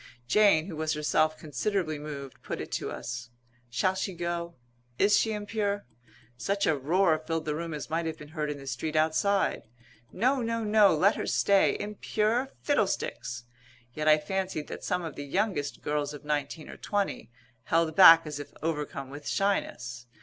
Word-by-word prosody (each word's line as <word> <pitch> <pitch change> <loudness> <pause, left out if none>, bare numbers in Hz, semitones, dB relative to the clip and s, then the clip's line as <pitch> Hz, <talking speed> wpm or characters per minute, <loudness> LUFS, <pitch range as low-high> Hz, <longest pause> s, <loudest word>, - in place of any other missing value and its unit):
Jane, 180 - +5
who 180 -4 -7
was 155 0 -1
herself 155 +1 +1
considerably 155 +1 -2
moved, 140 -3 -8
put - - -5
it - - -6
to - - -2
us: 120 0 -6 0.4
"Shall 120 +11 +1
she 190 0 -3
go? 170 0 -3 0.4
Is 205 +1 +4
she 220 - +2
impure?" 205 -1 -2 0.5
Such 200 +10 -1
a 155 - +3
roar 160 +4 +2
filled 160 0 -3
the 150 - -1
room 165 +2 -4
as 150 -1 -5
might 165 +1 -1
have 160 0 -4
been 150 - -11
heard 155 -2 -3
in 145 - -3
the 135 - -11
street 135 +4 -3
outside. 160 - +1 0.4
"No! 255 +6 +1
No! 230 -1 -1
No! 210 -4 +5
Let 190 +7 +3
her - - -3
stay! 200 -1 +3
Impure? 215 +4 -1
Fiddlesticks!" 190 - -1 0.5
Yet 155 +3 -3
I 155 0 +7
fancied 185 0 -3
that - - -7
some 180 - -1
of 160 -3 -6
the 145 - -5
youngest, 175 -1 -2
girls 150 0 -1
of 145 - -12
nineteen 150 +1 -2
or - - -9
twenty, 200 - -2 0.4
held 165 0 +1
back 165 -3 +9
as 150 -1 -5
if 145 - -8
overcome 150 -4 -3
with 145 +1 -9
shyness. 125 -11 -1
160 Hz, 175 wpm, -28 LUFS, 150-200 Hz, 0.5 s, back